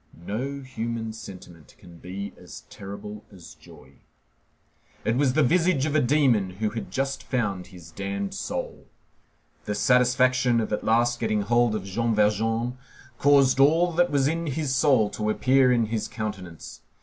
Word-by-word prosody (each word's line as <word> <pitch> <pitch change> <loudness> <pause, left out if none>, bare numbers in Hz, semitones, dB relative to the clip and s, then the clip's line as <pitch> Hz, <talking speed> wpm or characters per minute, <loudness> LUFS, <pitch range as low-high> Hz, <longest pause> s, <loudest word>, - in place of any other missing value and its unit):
No 135 +8 -4
human 115 -3 -4
sentiment 90 -7 -12
can 85 -2 -15
be 95 +4 -7
as - - -12
terrible 100 +1 -8
as 90 -4 -13
joy. 65 +1 -17 1.1
It 115 - +1
was 135 -1 +2
the 155 +2 +3
visage 170 -1 +2
of 155 - -2
a 155 - +4
demon 125 -7 +2
who 105 0 -1
has 110 -2 -5
just 135 +6 -2
found 100 -8 -2
his 85 -3 -13
damned 100 +1 -4
soul. - - -5 0.8
The 105 - -2
satisfaction 125 0 +3
of 110 -1 -2
at - - -2
last 120 +1 +2
getting 110 -2 0
hold 120 +1 +2
of 105 - -3
Jean 115 +4 -1
Valjean 115 +4 0 0.4
caused 140 -2 +4
all 165 +6 +4
that 175 +1 +2
was 140 -2 +2
in 165 +2 -2
his 145 -1 -2
soul 130 -6 +3
to 105 0 -2
appear 130 +3 +3
in 120 -2 +2
his 110 0 -3
countenance. 95 -7 -7
115 Hz, 160 wpm, -25 LUFS, 105-135 Hz, 1.1 s, a